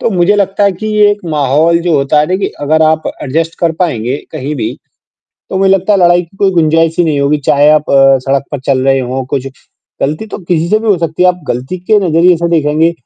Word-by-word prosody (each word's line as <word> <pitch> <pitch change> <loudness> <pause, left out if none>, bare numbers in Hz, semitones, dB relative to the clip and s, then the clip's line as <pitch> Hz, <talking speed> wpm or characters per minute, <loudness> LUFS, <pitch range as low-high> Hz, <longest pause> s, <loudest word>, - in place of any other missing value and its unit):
तो 235 - -1
मुझे 190 +1 +2
लगता 200 0 0
है 200 - +2
कि 185 +4 -7
ये 205 -1 +5
एक 205 0 -3
माहौल 150 +3 +2
जो 170 -1 0
होता 140 +2 +1
है 150 - 0
ना 185 +3 -1
कि 195 - -2
अगर 155 +2 +1
आप 155 0 +2 0.2
एडजस्ट 165 +4 -3
कर 170 -2 0
पाएँगे 125 -6 -2 0.2
कहीं 150 -1 -4
भी, 110 - -4 0.7
तो 190 - -2
मुझे 190 0 +2
लगता 195 +2 +1
है 200 - +2
लड़ाई 175 0 +4
की 175 +3 -21
कोई 195 -1 +1
गुंजाइश 165 -1 +1
ही 175 - +4
नहीं 150 -3 0
होगी 145 +2 +1
चाहे 145 +1 +4
आप 155 -1 +2
अ, 135 0 +5
सड़क 135 +1 -1
पर 145 - -4
चल 135 -2 +2
रहे 135 0 +2
हों 130 +1 -3
कुछ 135 -1 -2 0.5
गलती 155 +9 -2
तो - - -7
किसी 170 -3 -2
से 215 - +2
भी 225 - -5
हो 200 - +3
सकती 165 +1 -2
है - - +5
आप 180 0 -4
गलती 130 +9 -4
के 195 +5 +1
नज़रिए 175 -1 +2
से 170 - -1
देखेंगे, 160 0 +1
165 Hz, 250 wpm, -11 LUFS, 145-180 Hz, 0.7 s, ये